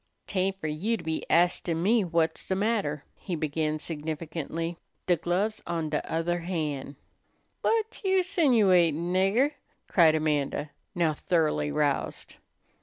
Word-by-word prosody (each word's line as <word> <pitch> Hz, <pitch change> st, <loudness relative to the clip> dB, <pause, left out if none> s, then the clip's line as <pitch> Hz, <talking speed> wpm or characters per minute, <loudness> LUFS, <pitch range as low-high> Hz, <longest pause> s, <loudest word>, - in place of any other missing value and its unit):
"'Tain't 190 Hz, 0 st, -1 dB
fer -, -, -7 dB
you 175 Hz, +10 st, -1 dB
to 175 Hz, -, -10 dB
be 160 Hz, -1 st, -2 dB
astin' 170 Hz, -1 st, +2 dB
me 225 Hz, +4 st, +4 dB
whut's 165 Hz, -3 st, 0 dB
de 190 Hz, -, 0 dB
matter," 195 Hz, -8 st, 0 dB
he 180 Hz, -, -5 dB
began 155 Hz, 0 st, -1 dB
significantly. 160 Hz, +1 st, -4 dB, 0.3 s
"De 175 Hz, -, +4 dB
glove's 185 Hz, +7 st, -1 dB
on 165 Hz, -2 st, -2 dB
de 150 Hz, -, -1 dB
other 170 Hz, +2 st, 0 dB
han'." 155 Hz, -6 st, -3 dB, 0.7 s
"Whut 445 Hz, 0 st, 0 dB
you 380 Hz, -1 st, +3 dB
'sinuatin', 190 Hz, -, +3 dB
nigger?" 200 Hz, +10 st, +3 dB, 0.4 s
cried 160 Hz, -4 st, +5 dB
Amanda, 150 Hz, -1 st, -1 dB, 0.2 s
now 165 Hz, -3 st, +2 dB
thoroughly 150 Hz, -2 st, 0 dB
roused. 145 Hz, -2 st, -1 dB
170 Hz, 130 wpm, -28 LUFS, 155-195 Hz, 0.7 s, cried